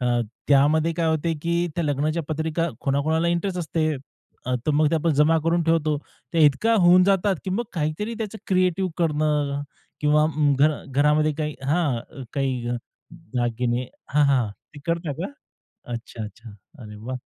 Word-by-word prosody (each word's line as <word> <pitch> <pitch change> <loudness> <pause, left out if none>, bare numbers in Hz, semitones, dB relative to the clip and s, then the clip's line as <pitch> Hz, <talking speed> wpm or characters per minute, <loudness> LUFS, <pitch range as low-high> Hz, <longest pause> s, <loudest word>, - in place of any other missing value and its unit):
अ, 120 -1 +1 0.3
त्यामध्ये 150 +4 +4
काय 170 -2 +1
होते, 160 +1 +1
की 170 +1 +1
त्या 170 - -1
लग्नाच्या 150 +3 0
पत्रिका 160 +2 -1
कोणाकोणाला 155 +4 +1
इंटरेस्ट 180 +2 -1
असते. 160 -2 -1 0.6
अ, 125 - 0
तर 155 - +3
मग 150 0 +3
ते - - +2
आपण 165 +1 +1
जमा 155 +3 +4
करून 170 +1 +2
ठेवतो. 155 -2 +2 0.4
ते 165 -2 +5
इतका 150 +11 +3
होऊन 180 +1 +7
जातात, 195 -1 +2
की 190 - -3
मग 220 +6 -1
काहीतरी 165 +7 -2
त्याचं 220 0 -4
क्रिएटिव्ह 185 0 +1
करणं 150 -3 +1 0.4
किंवा 150 +1 +4
मग 145 -2 +3
घर 150 0 +3
घरामध्ये 150 +3 +2
काही 150 -1 -2
हां, 140 -2 -1
काही 130 -4 -1 0.4
दागिने 125 -6 -2 0.3
हां, 150 0 +5
हां, 130 -5 +2 0.3
ते 145 - -10
करता 170 -2 -1
का? 195 - -5 0.6
अच्छा-अच्छा. 115 -1 -7 0.3
अरे 105 -1 -9
वाह! 125 +5 -5
155 Hz, 155 wpm, -24 LUFS, 140-170 Hz, 0.6 s, होऊन